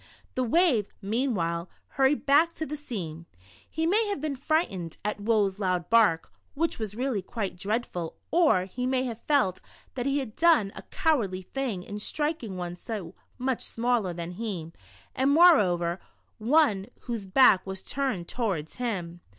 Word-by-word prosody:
The 255 Hz, -, 0 dB
wave, 250 Hz, -, +3 dB
meanwhile, 195 Hz, -6 st, -1 dB, 0.2 s
hurried 270 Hz, +2 st, +2 dB
back 310 Hz, +4 st, +4 dB
to 315 Hz, -, -4 dB
the 300 Hz, -, -5 dB
sea. 185 Hz, -, -6 dB, 0.5 s
He 320 Hz, +1 st, -1 dB
may 420 Hz, +6 st, +3 dB
have 405 Hz, -6 st, -2 dB
been 295 Hz, -1 st, -2 dB
frightened 255 Hz, -, -1 dB
at 210 Hz, 0 st, -2 dB
Woe's 205 Hz, -3 st, +1 dB
loud 185 Hz, -2 st, -1 dB
bark, 215 Hz, -8 st, +4 dB, 0.2 s
which 325 Hz, -1 st, 0 dB
was 210 Hz, -2 st, -4 dB
really 250 Hz, -4 st, -1 dB
quite 200 Hz, 0 st, -4 dB
dreadful, 185 Hz, -4 st, -3 dB, 0.2 s
or 315 Hz, -, +4 dB
he 250 Hz, +7 st, -3 dB
may 260 Hz, 0 st, +1 dB
have 235 Hz, -3 st, -5 dB
felt 265 Hz, -12 st, +2 dB, 0.3 s
that 250 Hz, 0 st, -2 dB
he 275 Hz, +1 st, +1 dB
had 260 Hz, -7 st, -4 dB
done 320 Hz, -13 st, +4 dB
a -, -, -7 dB
cowardly 230 Hz, -, 0 dB
thing 235 Hz, -5 st, -3 dB
in 205 Hz, +2 st, -6 dB
striking 295 Hz, -, -2 dB
one 175 Hz, -1 st, -4 dB
so 190 Hz, -3 st, -6 dB, 0.2 s
much 255 Hz, -1 st, -1 dB
smaller 235 Hz, -5 st, 0 dB
than 170 Hz, 0 st, -5 dB
he, 180 Hz, -5 st, -5 dB, 0.4 s
and 265 Hz, +1 st, +2 dB
more 335 Hz, +2 st, +7 dB
over 175 Hz, -2 st, 0 dB, 0.4 s
one 220 Hz, -5 st, +3 dB
whose 230 Hz, -5 st, -5 dB
back 190 Hz, -2 st, +6 dB
\\as 190 Hz, 0 st, -6 dB
turned 255 Hz, -11 st, -2 dB
towards 190 Hz, -11 st, -3 dB
him. 180 Hz, -8 st, -3 dB
225 Hz, 160 wpm, -27 LUFS, 185-275 Hz, 0.5 s, more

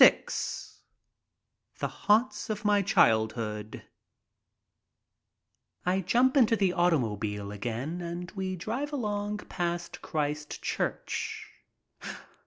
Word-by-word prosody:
VI -, -, +9 dB, 1.5 s
THE -, -, -1 dB
HAUNTS 225 Hz, +4 st, +2 dB
OF 215 Hz, 0 st, -3 dB
MY 205 Hz, -1 st, +5 dB
CHILDHOOD 110 Hz, -, +2 dB, 2.0 s
r 185 Hz, +2 st, +3 dB
JUMP 245 Hz, -, +3 dB
into 235 Hz, -4 st, +6 dB
the 195 Hz, -4 st, +2 dB
automobile 110 Hz, -, +1 dB
again 120 Hz, -, -3 dB
and 175 Hz, +1 st, -5 dB
we 190 Hz, -2 st, -3 dB
drive 235 Hz, -, -3 dB
along 210 Hz, -6 st, -1 dB
■■• -, -, -11 dB
past 175 Hz, -1 st, -3 dB
Christ 150 Hz, -1 st, -2 dB
Church. -, -, -2 dB
175 Hz, 95 wpm, -29 LUFS, -, 2.0 s, VI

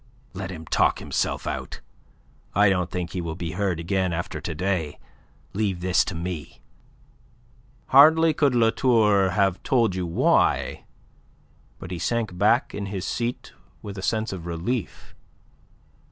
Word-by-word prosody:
"Let 95 Hz, -1 st, -5 dB
him 80 Hz, -3 st, -8 dB
talk -, -, +2 dB
himself -, -, -2 dB
out. -, -, -5 dB, 0.8 s
I 100 Hz, +1 st, +5 dB
don't 90 Hz, -2 st, 0 dB
think 90 Hz, -1 st, -4 dB
he 90 Hz, -, -3 dB
will 80 Hz, -1 st, -4 dB
be 85 Hz, -2 st, -5 dB
heard 90 Hz, -1 st, -1 dB
again 95 Hz, +1 st, -1 dB
after 85 Hz, +1 st, -4 dB
to -, -, -5 dB
day. 90 Hz, -6 st, -2 dB, 0.6 s
Leave 100 Hz, -4 st, -1 dB
this 90 Hz, 0 st, +3 dB
to 95 Hz, -, -5 dB
me." 85 Hz, -2 st, -6 dB, 1.3 s
Hardly 160 Hz, +4 st, +7 dB
could 145 Hz, -4 st, +2 dB
La 115 Hz, -1 st, +4 dB
Tour 105 Hz, -7 st, +3 dB
have 95 Hz, 0 st, +1 dB
told 115 Hz, -7 st, +2 dB
you 90 Hz, -1 st, -3 dB
why, 85 Hz, -, +1 dB, 0.9 s
but 90 Hz, -1 st, -9 dB
he 90 Hz, -, -4 dB
sank 115 Hz, -4 st, -1 dB
back 105 Hz, +6 st, +2 dB
in 100 Hz, -1 st, -4 dB
his 95 Hz, -1 st, -4 dB
seat 120 Hz, +1 st, -3 dB, 0.3 s
with 100 Hz, -1 st, -7 dB
a 95 Hz, -, -6 dB
sense 110 Hz, +1 st, -1 dB
of 85 Hz, -3 st, -7 dB
relief. 85 Hz, +6 st, -4 dB
95 Hz, 150 wpm, -24 LUFS, 90-110 Hz, 1.3 s, Hardly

